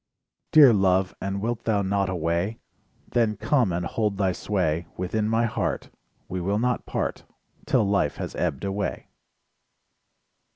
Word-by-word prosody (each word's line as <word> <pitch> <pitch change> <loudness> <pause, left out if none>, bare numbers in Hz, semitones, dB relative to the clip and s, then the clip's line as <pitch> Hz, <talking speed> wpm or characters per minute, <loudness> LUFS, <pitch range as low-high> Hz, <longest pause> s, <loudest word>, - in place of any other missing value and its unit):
Dear 145 -6 +8
Love, 95 -1 +2
and 100 0 -3
wilt 120 0 -2
thou 105 -3 +2
not 100 0 0
away? 85 +4 -1 0.5
Then 110 -3 +1
come 115 0 +2
and 85 +1 -2
hold 105 +1 -1
thy 95 -2 +2
.sway 85 -4 -1
Within 105 +4 -1
my 115 +1 +2
heart, 95 - -2 0.4
We 90 0 -4
will 100 +4 0
not 125 +2 -1
part, - - -2 0.4
'Till 105 - +3
life 100 0 +1
has - - -5
ebbed - - -2
away. 100 -1 -3
100 Hz, 140 wpm, -25 LUFS, 90-110 Hz, 0.5 s, Dear